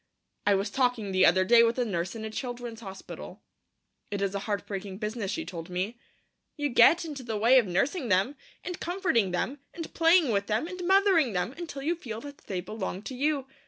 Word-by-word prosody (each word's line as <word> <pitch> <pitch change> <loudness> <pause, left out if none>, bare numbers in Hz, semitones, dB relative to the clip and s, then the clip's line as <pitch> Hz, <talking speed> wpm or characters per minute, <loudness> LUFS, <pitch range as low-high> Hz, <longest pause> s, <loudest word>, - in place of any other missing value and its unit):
I 205 - +5
was 200 +2 -1
talking 245 -6 0
the 185 0 +5
other 185 +2 +4
day 235 +3 +7
with 230 +1 +3
a 250 - +1
nurse 180 -2 -2
in 220 -1 -5
a 220 - -5
children's 240 -1 -5
hospital. 195 -4 -9 0.7
It 205 - -3
is 195 0 -1
a 200 - -1
heartbreaking 200 -1 -3
business, 210 -1 -3
she 205 - -3
told 165 -1 -7
me. 190 +7 -3 0.6
'You 290 -1 0
get 335 +7 +6
into 295 -4 -6
the 225 -3 -3
way 240 +5 +6
of 230 - 0
nursing 245 - 0
them, 195 +9 +2 0.3
and 360 -2 -5
comforting 345 - +1
them, 235 +11 -2 0.2
and 330 -2 -7
playing 330 -4 +4
with 200 -1 0
them, 220 +9 0
and 365 0 -6
mothering 380 - +4
them, 180 +7 -1
until 320 -5 -6
you 325 +4 +1
feel 225 -10 -7
that 285 +1 -10
they 185 -3 -2
belong 190 0 -5
to 260 - -6
you. 285 +1 0
230 Hz, 205 wpm, -28 LUFS, 195-285 Hz, 0.7 s, day